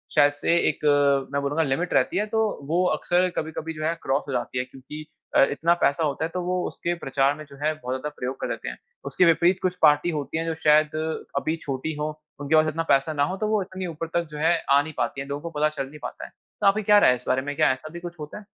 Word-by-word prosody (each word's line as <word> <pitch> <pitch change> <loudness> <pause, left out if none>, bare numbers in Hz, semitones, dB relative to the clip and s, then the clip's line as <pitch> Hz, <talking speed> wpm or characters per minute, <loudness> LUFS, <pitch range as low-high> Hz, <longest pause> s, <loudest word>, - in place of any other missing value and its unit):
शायद 145 -1 +5
से 145 +4 +1
एक 150 - -4
अ, 140 -2 +3
मैं 140 - +1
बोलूँगा 145 +3 0
लिमिट 160 +5 -1
रहती 130 +6 +2
है 210 - +1
तो 220 +1 -1 0.3
वो 175 +3 +2
अक्सर 180 +1 +1
कभी-कभी 160 +1 -4
जो 155 -1 -6
है 165 - +1
क्रॉस 135 +2 0
हो 140 - -4
जाती 125 0 -2
है 125 - -1
क्योंकि 135 +4 -10 0.3
अ, - - +7
इतना 165 +4 +2
पैसा 140 +3 +2
होता 150 +1 -1
है - - -4
तो 180 - -2
वो 180 0 0
उसके 175 - -3
प्रचार 135 +1 +2
में 155 - -9
जो 140 - -13
है 155 - +2
बहुत 130 -4 -4
ज़्यादा 130 +3 -4
प्रयोग 130 +2 -4
कर - - -1
देते - - -4
हैं। 60 - -8 0.3
उसके 140 +6 +2
विपरीत 170 +2 +4
कुछ 185 -1 0
पार्टी 150 +2 +5
होती 150 0 -3
है 165 - -1
जो 165 - -1
शायद 155 0 +4 0.4
अभी 160 - 0
छोटी 140 +3 -3
हो 150 - -1 0.3
उनके 145 +2 +1
पास 155 0 +5
इतना 165 +2 -2
पैसा 135 +3 +3
ना 145 -1 +1
हो 190 - -4
तो 215 - -1
वो 215 -1 +1
इतनी 185 -1 -5
ऊपर 165 0 -5
तक 170 -1 0
जो 150 - -7
है 165 +3 +3
आ 140 +1 +6
नहीं 155 +1 -7
पाती 120 +3 -1
हैं। 135 - -7
लोगों 140 +1 -4
को 150 - -5
पता 155 +1 +3
चल 135 - -2
नहीं 150 +1 -12
पाता - - -6
है। - - -11 0.3
तो - - +4
आपकी 210 +2 +3
क्या 210 +1 +6
राय - - +6
है 125 - +4
इस 125 - -11
बारे 130 - +2
में? 145 +1 -5
क्या 155 -2 +4
ऐसा 130 +4 -9
भी 170 - -6
कुछ 175 -1 -9
होता 150 +6 -7
है? 210 - -11
155 Hz, 280 wpm, -25 LUFS, 140-170 Hz, 0.4 s, अ